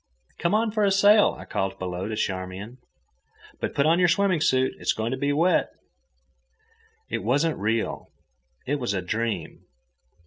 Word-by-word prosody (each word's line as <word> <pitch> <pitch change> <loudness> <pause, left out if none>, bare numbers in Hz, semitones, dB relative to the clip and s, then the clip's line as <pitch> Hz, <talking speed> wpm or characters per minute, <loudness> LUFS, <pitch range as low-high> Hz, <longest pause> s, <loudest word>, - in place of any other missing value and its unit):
"Come 170 +4 +1
on 220 0 +1
for 215 0 0
a 200 - +4
sail," 205 +2 +5
I - - -10
called 95 0 -3
below 90 0 -4
to 110 - -3
Charmian. 95 +4 -4 0.8
"But - - -4
put 140 - +2
on 165 +3 +4
your 180 - +5
swimming 185 -1 +2
suit. 130 -2 +2
It's - - 0
going 110 +2 -3
to - - 0
be 140 +2 0
wet." 165 +5 +2 1.4
It - - -1
wasn't 145 +6 +1
real. 110 +2 -1 0.6
It 145 +2 -1
was 120 -6 -2
a 95 - -2
dream. 105 -2 -3
130 Hz, 165 wpm, -25 LUFS, -, 1.4 s, sail